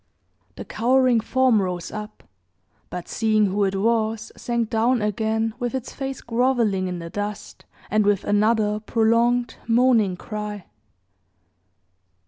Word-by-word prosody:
The - - -8
cowering 255 0 +2
form 250 -1 +2
rose 180 -2 -4
up; 210 0 -8 0.7
but, 180 -1 -6
seeing 215 -2 +2
who 200 +1 +1
it 195 0 -1
was, 220 +1 0
sank 235 -2 -2
down 235 +3 +2
again, 220 +1 -1
with 245 0 -2
its 260 -1 -5
face 270 -1 -5
groveling 230 -5 +1
in 180 -1 -4
the 170 -1 -8
dust, 205 0 -6 0.3
and 215 0 +3
with 205 -1 +2
another 210 0 +2
prolonged, 230 +2 +1
moaning 230 -5 +3
cry. 210 -1 -6
220 Hz, 125 wpm, -23 LUFS, 205-235 Hz, 0.7 s, and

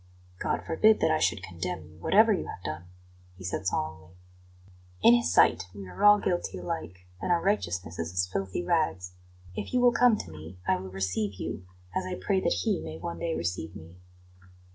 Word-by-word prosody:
"God - - -1
forbid 215 +7 +4
that 160 - +3
I 155 - +2
should 100 -4 +1
condemn 85 -2 -4
you, 80 +1 -17
whatever 220 +2 +5
you 185 - -2
have 90 - -8
done!" 80 +3 -5 0.5
he 95 - -11
said 90 +1 -3
solemnly. 90 +3 -3 0.9
"In 235 - +9
His 240 0 +3
sight - - +4
we 100 -1 -8
are 90 - -6
all 205 0 +9
guilty 175 - -1
alike, 90 0 -5 0.2
and - - -1
our 175 - +4
righteousness 90 - -1
is 85 0 -2
as 90 0 +1
filthy 95 - -3
rags. 155 - 0 0.4
If 255 - -4
you - - +4
will 245 -1 +5
come 240 -2 +5
to 85 - -7
me 80 +3 -10
I - - +4
will 95 +1 -7
receive 95 +2 -2
you 90 -1 -6 0.3
as 185 - -1
I 185 - -3
pray 190 +1 0
that 90 - +1
He - - +1
may 80 0 -7
one 85 0 -5
day - - -1
receive 85 +1 -3
me." 85 -1 -12
95 Hz, 200 wpm, -28 LUFS, -, 0.9 s, In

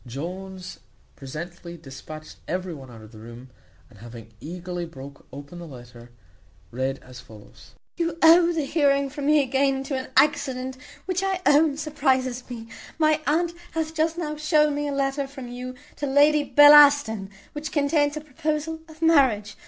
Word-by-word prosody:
Jones 185 +8 -7 0.4
presently 170 +5 -8
dispatched 155 +2 -11
every 180 0 -3
one 135 -4 -11
out 115 -2 -13
of 110 - -14
the 110 - -13
room, 120 +3 -12 0.4
and, 115 -6 -19
having 115 0 -12
eagerly 175 +5 -6
broke 140 -4 -11
open 145 +5 -10
the 170 - -9
letter, 120 -3 -13 0.6
read 130 +2 -2
as 125 0 -12
follows: 110 -4 -16 0.2
"You 335 -2 -2
owe 335 +1 +7
the 320 -4 -2
hearing 280 -2 +1
from 290 -1 -4
me 300 -1 +4
again 270 +1 0
to 270 0 -4
an 260 0 -4
accident 260 -2 +1 0.3
which 370 0 -1
I 385 -1 -1
own 295 0 +4
surprizes 260 -5 -1
me. 230 -2 -8 0.3
My 310 -1 +2
aunt 335 +4 +1 0.2
hath 320 -1 -2
just 325 +1 0
now 305 -3 -4
shown 300 -1 +2
me 290 0 -2
a - - -2
letter 275 0 -1
from 270 -2 -9
you 250 +1 -7 0.2
to 290 - -3
Lady 290 +2 +4
Bellaston, 290 -9 +6 0.2
which 300 0 -6
contains 290 0 +1
a - - -5
proposal 310 +2 -3
of 315 +1 -10
marriage. 250 -10 +3
270 Hz, 165 wpm, -24 LUFS, -, 0.6 s, owe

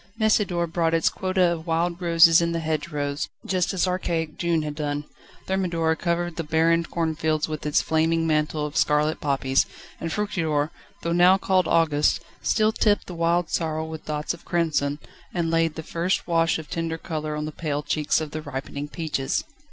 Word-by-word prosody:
Messidor 210 -5 +2
brought 165 0 0
its 165 - +3
quota 185 -1 0
of 165 0 -5
wild 170 +2 0
roses 165 -1 +6
in 170 0 0
the 165 - -1
hedgerows, 150 -2 -2 0.2
just 185 -2 0
as 190 -1 +1
archaic 170 -4 -1
June 170 -2 0
had 150 -1 -3
done. 145 -1 -3 0.4
Thermidor 170 -4 0
covered 170 0 -2
the 165 - -1
barren 165 +2 +2
cornfields 160 -2 -1
with 155 -1 -4
its 150 - +2
flaming 165 +1 +1
mantle 155 -1 0
of 150 +1 -6
scarlet 150 -1 +2
poppies, 135 -2 +1 0.3
and 165 - -3
Fructidor, 160 -8 -1 0.3
though 170 - 0
now 180 +2 +6
called 190 -2 +2
August, 155 -1 +3 0.2
still 215 0 +2
tipped 210 -1 +2
the 180 - -8
wild 170 0 +1
sorrel 160 -1 -1
with 160 -1 -8
dots 150 +1 -2
of 170 - -12
crimson, 155 -4 0 0.4
and 165 -2 0
laid 165 -1 +2
the 160 - -6
first 170 +4 -1
wash 165 -1 +2
of 160 -2 -8
tender 165 -1 -3
colour 155 -2 -4
on 150 0 -3
the 155 - -4
pale 150 -2 -3
cheeks 150 0 +1
of 155 -2 -5
the 155 - -4
ripening 140 0 -5
peaches. 150 -4 -2
165 Hz, 180 wpm, -24 LUFS, 155-170 Hz, 0.4 s, roses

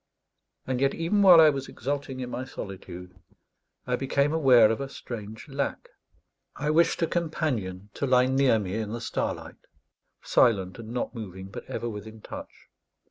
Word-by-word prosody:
And 130 -1 -2
yet 135 0 +2
even 170 +5 +1
while 185 -4 +9
I 155 -1 +8
was 135 -1 -4
exulting 135 0 -4
in 125 -1 -5
my 130 - -3
solitude 90 -6 -8 0.7
I 125 - 0
became 140 +3 +1
aware 130 -8 +6
of 115 - -2
a 135 - -4
strange 110 -4 -8
lack. 140 0 -3 0.7
I 150 +1 -1
wished 170 +2 +3
a - - +5
companion 120 - -2
to 140 - -2
lie 125 -1 +5
near 130 -2 +3
me 95 -3 -3
in 110 -1 -3
the 120 - -3
starlight, 120 - -4 0.6
silent 95 -5 +2
and 110 -1 -8
not 120 -1 -3
moving, 95 -5 -8
but - - -8
ever 120 - -4
within 110 0 -7
touch. - - -10
125 Hz, 165 wpm, -27 LUFS, 110-140 Hz, 0.7 s, while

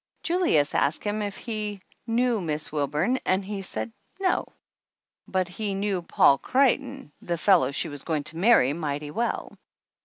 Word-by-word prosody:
Julius 335 - +2
asked 145 +3 +1
him 210 +1 -1
if 205 -1 -4
he 210 -3 -4 0.3
knew 235 -1 +1
Miss 155 -2 -3
Wilburn 150 - 0
and 190 +1 +1
he 200 0 -4
said 210 +4 -2 0.3
no, 375 -2 +1 0.8
but 185 -1 0
he 200 +2 -3
knew 195 -2 -1
Paul 140 -4 +4
Creighton, 270 - +1
the 170 -1 -2
fellow 165 -8 +4
she 140 - 0
was 145 -2 -7
going 155 -3 -1
to 160 - -5
marry, 180 - +5
mighty 145 -2 -4
well. 235 +8 -3
190 Hz, 155 wpm, -26 LUFS, 150-225 Hz, 0.8 s, marry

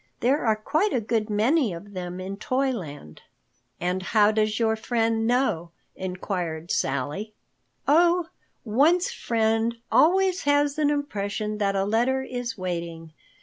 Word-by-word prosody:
There 270 +5 +2
are 220 -2 +3
quite 310 - 0
a 250 - +2
good 220 0 -1
many 230 - +2
of 200 +5 -10
them 180 -1 -5
in 190 +1 -5
Toyland." 205 - -3 0.6
"And 180 +2 -1
how 210 +2 +3
does 215 0 +1
your 220 -1 +2
friend 225 0 0
know?" 240 -9 +1 0.3
inquired 180 -3 -4
Sally. 145 +11 -2 0.5
"Oh, 340 +3 +4 0.4
one's 305 - +3
friend 225 0 0
always 375 +2 +4
has 290 +1 +2
an 295 -1 +3
impression 215 -7 -2
that 200 -1 +1
a 195 0 +1
letter 245 +5 +1
is 245 -3 -5
waiting. 170 -3 -5
220 Hz, 135 wpm, -25 LUFS, 190-265 Hz, 0.6 s, Oh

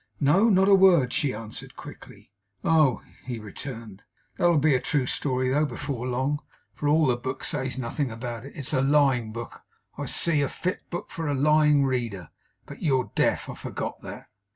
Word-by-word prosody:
'No. 185 +11 +4
Not 190 -2 +4
a 200 - +6
word,' 180 -10 +5
she 145 - +1
answered 110 -2 -8
quickly. - - -12 0.3
'Oh!' 155 -6 +3 0.2
he 125 -2 -4
returned. 110 -1 -8 0.3
'That'll 175 -2 +3
be 150 0 +3
a 130 - +3
true 145 -4 0
story 130 0 -1
though, 150 +3 +2
before 130 -4 -4
long; 130 +4 -1 0.3
for 145 - -3
all 155 +1 +4
the 125 -3 +2
book 130 +2 -5
says 130 -2 -2
nothing 130 +2 -2
about 115 0 -6
it. 140 - -10
It's 140 +1 -4
a 130 - +2
lying 135 -5 +3
book, 115 +1 -8 0.4
I - - -3
see. 160 -4 +1
A 140 - 0
fit 185 - -3
book 175 - -6
for 165 -1 -4
a 145 - 0
lying 150 0 +4
reader. 115 - -2 0.4
But - - -11
you're 135 -6 +1
deaf. - - +1
I - - -6
forgot - - -6
that. - - -9
135 Hz, 185 wpm, -26 LUFS, 125-150 Hz, 0.4 s, a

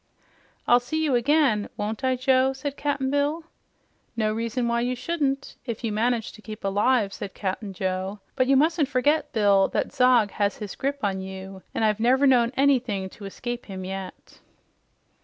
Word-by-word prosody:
"I'll 245 - +6
see 315 +6 -2
you 285 - +1
again, 245 -4 +2
won't 215 +5 -3
I, 260 0 +2
Joe?" 260 +1 +3
said 275 +1 -5
Cap'n 280 -2 -1
Bill. 290 +3 0 0.7
"No 215 -1 +1
reason 230 +2 -2
why 235 0 +1
you 250 +1 -1
shouldn't, 275 -2 -2
if 235 -2 -5
you 225 - -1
manage 230 +1 0
to 215 - -15
keep 215 0 -9
alive," 205 +2 +2
said 200 - -7
Cap'n 195 +1 -3
Joe. 190 +2 -3 0.2
"But 255 - +2
you 275 - +4
mustn't 310 +1 +3
forget, 290 +3 +1
Bill, 200 -3 +4
this - - -2
Zog 250 -5 +4
has 205 -1 0
his 210 -3 -6
grip 280 +1 -3
on 195 -2 0
you, 190 0 -8
an' - - 0
I've 215 -1 +2
never 255 +5 +3
known 245 -3 +4
anything 250 -9 +2
to 205 - -11
escape 240 +5 -6
him 190 -2 -6
yet." 190 0 -8
235 Hz, 175 wpm, -25 LUFS, 205-270 Hz, 0.7 s, I'll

